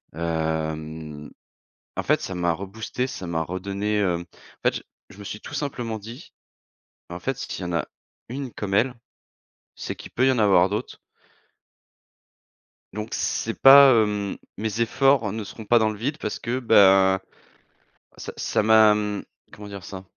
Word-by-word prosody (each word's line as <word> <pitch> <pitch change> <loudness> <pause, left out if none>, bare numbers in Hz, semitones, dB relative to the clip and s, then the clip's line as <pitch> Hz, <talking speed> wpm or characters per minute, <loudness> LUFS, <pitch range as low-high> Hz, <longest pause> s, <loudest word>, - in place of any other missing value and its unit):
Hem, 80 -2 -3 0.7
en - - -1
fait - - +2
ça 95 - -5
m'a 85 -1 +1
reboosté, 110 +7 -4
ça 95 -8 -7
m'a 80 -1 -1
redonné, 100 +4 -3
hem 90 -4 0
en 85 - -23
fait - - -8
je - - -9 0.3
je 100 - -15
me - - -8
suis 105 - -7
tout - - -10
simplement 120 -6 -3
dit: 115 - -11 0.8
«En 90 +1 -6
fait, 135 +8 -2
s'il - - -6
y - - -4
en 85 - -4
a 85 - 0 0.4
une 130 0 -5
comme 100 -2 -4
elle, 120 +6 +2 0.8
c'est - - -5
qu'il - - -11
peut 130 +2 +2
y 130 - +5
en 130 - 0
avoir 95 -3 +5
d'autres». 105 +5 -4 2.0
Donc 105 +2 -5
c'est 115 - -2
pas, 135 0 +9
hem 105 -2 -2 0.2
mes 110 +1 -3
efforts 130 -1 +3
ne 110 0 -4
seront 110 +2 -10
pas 120 +3 +4
dans 110 -1 +2
le 105 - -7
vide 140 +7 -3
parce 105 - -4
que, 120 +2 -2
ben, 95 -5 +5 1.0
ça - - -7
ça - - 0
m'a, 110 0 +6
hem, 105 -1 -2 0.3
comment 105 0 -10
dire 100 -2 -8
ça? 95 +2 -8
105 Hz, 170 wpm, -24 LUFS, 95-115 Hz, 2.0 s, pas